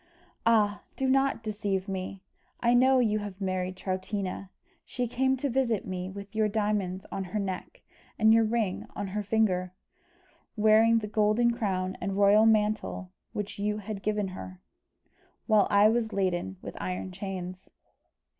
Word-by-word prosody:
"Ah! 210 -3 +3
do 265 - -1
not 270 -2 +2
deceive 205 -3 -2
me. 190 0 -5 0.4
I 235 0 +3
know 260 +2 +5
you 215 -4 +2
have 205 -2 -7
married 185 -1 -2
Troutina. 190 0 -3 0.3
She 245 -1 -3
came 265 +3 +1
to 280 - -1
visit 245 -5 0
me 185 0 -4
with 200 +1 -9
your 215 -1 +3
diamonds 205 -3 -1
on 195 - -3
her 185 +4 -3
neck, 190 -2 -5 0.3
and 220 0 +5
your 225 0 +5
ring 220 -4 -1
on 200 - -3
her 210 +2 -2
finger, 190 -4 +1 0.8
wearing 220 +1 +5
the 215 -2 -2
golden 215 +3 +2
crown 190 -5 -2
and 195 +1 -2
royal 205 +2 +6
mantle 210 -3 +1 0.2
which 205 -1 -5
you 210 +1 0
had 210 -1 -6
given 210 -2 -1
her, 185 0 -9 0.9
while 215 -3 +4
I 205 +1 +6
was 225 0 +1
laden 175 - -1
with - - -7
iron 95 +1 -4
chains." 185 - -6
205 Hz, 155 wpm, -28 LUFS, 190-220 Hz, 0.9 s, royal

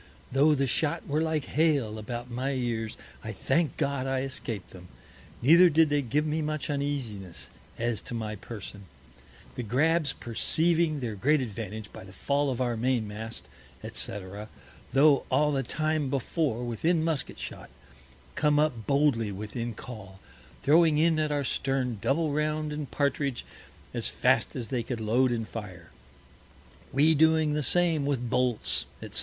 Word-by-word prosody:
Tho' 145 +4 +4
the 135 -1 +1
Shot 145 +4 -1
were 150 +2 +1
like 160 -3 0
Hail 140 -9 +1
about 120 +3 -5
my 130 +3 -2
Ears, 115 -4 -2 0.3
I - - -4
thank 165 -5 0
God 140 -1 -1
I 135 -1 0
escaped 120 -7 -5
them, 90 -1 -12 0.6
neither 170 +7 +8
did 160 0 +4
they 145 0 +2
give 140 +4 0
me 155 +1 0
much 155 -1 -2
Uneasiness 130 -11 -3 0.3
as 115 -1 -1
to 120 - -6
my 110 -2 -3
Person. 100 -1 -8 0.7
The - - -4
Grabbs 145 +7 +2
perceiving 160 +5 +1
their 115 -3 -2
great 145 +10 +2
Advantage 110 -3 -5
by - - -9
the 95 0 -13
Fall 140 +8 0
of 130 -2 -2
our 120 -2 0
Main 120 -1 0
mast, 110 +2 -6 0.4
&c. - - -5 0.8
tho' 140 +1 +5
all 150 0 +3
the 135 -2 +1
time 155 +2 -1
before 135 -2 -1
within 155 +8 +1
Musket 160 -4 -1
Shot, - - -7 0.6
come 150 -1 +2
up 145 -8 +1
boldly 140 -7 +2
within 110 +4 -5
Call, 100 -5 -10 0.4
throwing 160 +1 +5
in 160 0 +3
at 155 -1 0
our 145 -1 0
Stern 130 -3 -1
Double 155 +2 +1
round 150 +1 -1
and 150 -2 -5
Partridge 140 -2 -1 0.5
as - - -1
fast - - +2
as 120 -3 -4
they 125 -3 0
could 115 0 -4
load 120 +4 +2
and 115 -2 -2
fire; 90 -7 -8 1.0
we 150 +4 +5
doing 160 0 +4
the 150 - 0
same 165 -2 +3
with 125 -4 -1
Bolts, 125 -3 +1 0.2
_&c. - - -9
135 Hz, 160 wpm, -28 LUFS, 115-150 Hz, 1.0 s, neither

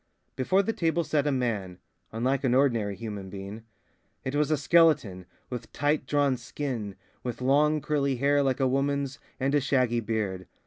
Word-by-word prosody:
Before 185 +10 +2
the 225 - -1
table 170 -2 +1
sat 150 -2 0
a - - +2
man, 110 -9 -2 0.3
unlike 130 +5 0
an 125 -2 +2
ordinary 115 -7 +2
human 105 -3 -6
being. 100 +3 -8 0.6
It 130 - -3
was 150 0 +1
a 155 - +2
skeleton, 145 - +3 0.2
with 125 - -6
tight 145 +2 0
drawn 145 -3 +2
skin, 120 -5 -4 0.3
with 120 -2 -5
long 150 +4 +3
curly 140 -2 0
hair 140 +3 +2
like 135 -1 0
a 135 - +3
woman's, 140 +1 -1 0.2
and 135 +1 0
a 145 - +3
shaggy 125 -3 +2
beard. 105 -5 -3
130 Hz, 170 wpm, -27 LUFS, 115-145 Hz, 0.6 s, skeleton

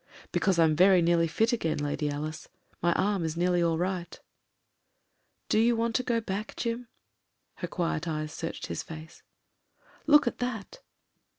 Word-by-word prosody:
"Because 190 -3 +2
I'm 160 -2 +4
very 185 +3 +6
nearly 170 0 +3
fit 225 +9 +1
again. 165 -9 0
Lady 145 0 -1
Alice. 155 +2 -5 0.3
My 175 - +3
arm 200 -1 +1
is 160 0 -3
nearly 175 0 +2
all 165 -1 +2
right." 180 0 -3 1.3
"Do - - +2
you 235 +1 +4
want 230 0 0
to - - 0
go 235 -2 0
back, 210 0 -4
Jim?" 235 +1 -3 0.7
Her - - -4
quiet 165 -2 -2
eyes 155 -1 -3
searched 165 0 -5
his - - -4
face. 160 +1 -10 0.9
"Look 295 -1 +7
at 240 - -2
that." 245 - -4
175 Hz, 160 wpm, -28 LUFS, 160-225 Hz, 1.3 s, Look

